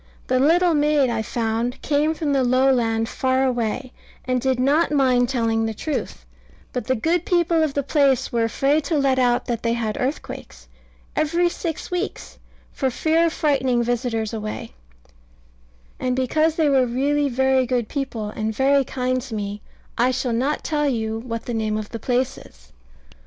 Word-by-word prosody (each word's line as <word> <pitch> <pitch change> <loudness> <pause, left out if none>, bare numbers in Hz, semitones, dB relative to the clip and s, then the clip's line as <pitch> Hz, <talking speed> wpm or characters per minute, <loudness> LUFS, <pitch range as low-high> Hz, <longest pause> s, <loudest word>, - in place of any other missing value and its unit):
The 255 0 +1
little 340 +5 +4
maid, 295 -3 +3
I 230 -1 -1
found, 230 +2 -2
came 305 +2 +1
from 300 -3 -1
the 270 -1 +2
lowland 245 -3 +2
far 260 +2 0
away, 245 0 -2 0.3
and 255 -1 0
did 260 -1 0
not 290 +5 +2
mind 255 -4 +3
telling 225 -3 0
the 220 - -4
truth: 305 +7 -4 0.5
but 250 -4 -3
the 260 - +2
good 325 +8 0
people 340 -2 +2
of 310 -3 0
the 285 - 0
place 275 -2 +2
were 235 -1 +1
afraid 275 +7 +1
to 315 +1 0
let 270 -2 +2
out 245 -1 +2
that 235 -2 -2
they 230 0 0
had 220 -3 -2
earthquakes 265 +4 -5 0.5
every 340 +3 +2
six 335 -1 -5
weeks, 360 +3 -4 0.3
for 265 - 0
fear 320 +6 +2
of 325 - -2
frightening 265 -5 +1
visitors 235 -2 -1
away: 215 - -5 1.3
and 255 -1 0
because 310 +5 +1
they 320 -2 +2
were 265 -3 +3
really 280 +4 +1
very 265 0 +2
good 245 -3 0
people, 235 -7 -4
and 220 0 -3
very 275 +2 +3
kind 255 0 -1
to 245 -3 -7
me, 205 0 -4 0.4
I 245 +2 +4
shall 255 -1 -1
not 265 +6 0
tell 295 -2 0
you 220 -3 -2
what 230 -1 -5
the 240 - -4
name 215 -1 -1
of 215 -1 -5
the 230 - -6
place 255 +3 -1
is. - - -18
255 Hz, 175 wpm, -22 LUFS, 235-290 Hz, 1.3 s, little